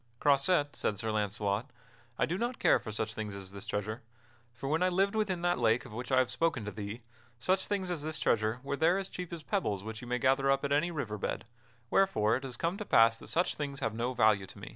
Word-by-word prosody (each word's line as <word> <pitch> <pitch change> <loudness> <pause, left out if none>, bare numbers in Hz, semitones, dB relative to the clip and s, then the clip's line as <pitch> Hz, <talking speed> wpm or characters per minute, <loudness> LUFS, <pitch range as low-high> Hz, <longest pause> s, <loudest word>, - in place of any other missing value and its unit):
"Croisette," 145 +1 +3
said 105 - -1
Sir 110 +2 -1
Launcelot, 105 +3 -1 0.5
"I - - +3
do 170 - -2
not 240 +5 -2
care - - +4
for 110 - -7
such 110 +1 -2
things 105 -2 -5
as 95 -1 -8
this 100 -1 -7
treasure; 110 +4 -3 0.5
for 120 +3 -7
when 155 +4 +1
I 185 - +4
lived 195 +3 +2
within 195 -5 0
that 175 -6 +2
lake 115 +1 +2
of 120 - -10
which 125 +3 -5
I 130 - +4
have 130 -1 +3
spoken 160 -10 0
to 105 - -4
thee, 105 +3 -6 0.4
such 185 +10 0
things 190 -3 -1
as 170 -4 -2
this 155 +1 -3
treasure 110 +1 +1
were 140 +1 -2
there 165 +5 +3
as 195 -1 -3
cheap 180 -2 -6
as 165 -2 -6
pebbles 105 - -1
which 110 +1 -6
you 125 - -9
may 125 0 0
gather 135 +2 +2
up 135 +1 +2
at 140 - -2
any 150 +5 +3
river 120 -11 -4
bed, - - -3 0.5
wherefore 110 - +3
it 130 - -3
has 130 -2 -6
come 170 +3 -1
to 210 - -4
pass 115 - +5
that - - -12
such 175 +2 +1
things 140 -2 -4
have 115 - -1
no 120 +3 -2
value 105 -4 +4
to - - -12
me." - - -8
130 Hz, 250 wpm, -31 LUFS, 110-170 Hz, 0.5 s, pass